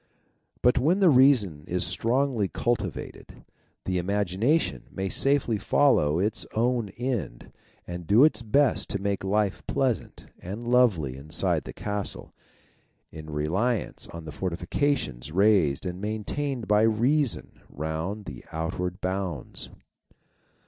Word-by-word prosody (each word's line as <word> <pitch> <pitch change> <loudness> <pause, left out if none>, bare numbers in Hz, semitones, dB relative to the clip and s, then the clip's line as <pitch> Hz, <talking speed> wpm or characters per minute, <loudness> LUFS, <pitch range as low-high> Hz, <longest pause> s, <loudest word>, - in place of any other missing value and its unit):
But 125 - +4
when 160 +8 +3
the 185 -5 +6
reason 125 - +4
is 90 0 +1
strongly 120 -3 +1
cul 120 +5 0
o - - +2
J 105 -5 -4
tivated, - - -10 0.4
the 90 -1 0
imagination 100 - 0
may 95 0 -3
safely 135 -2 +2
follow 80 - +3
its 105 +2 0
own 120 -1 +1
end, 120 - -4 0.3
and 85 -1 -7
do 110 +6 +6
its 155 -5 +3
best 130 +5 +2
to 100 - -2
make 100 0 -2
life 100 0 0
pleasant 125 -6 -1
and 100 +6 -6
lovely 100 - +3
inside 75 +3 -1
the - - -6
castle, 105 -1 -4 0.8
in 80 0 -9
reliance 95 +11 -1
on 85 -1 -9
the 75 - -6
fortifications 90 - -2
raised 95 -5 +3
and 90 +1 -4
maintained 110 +4 -3
by 105 0 +4
Reason 120 +5 +1
round 80 +8 -4
the 65 -6 -8
outward 90 +3 -3
bounds. 95 -7 -3
100 Hz, 130 wpm, -26 LUFS, 85-120 Hz, 0.8 s, the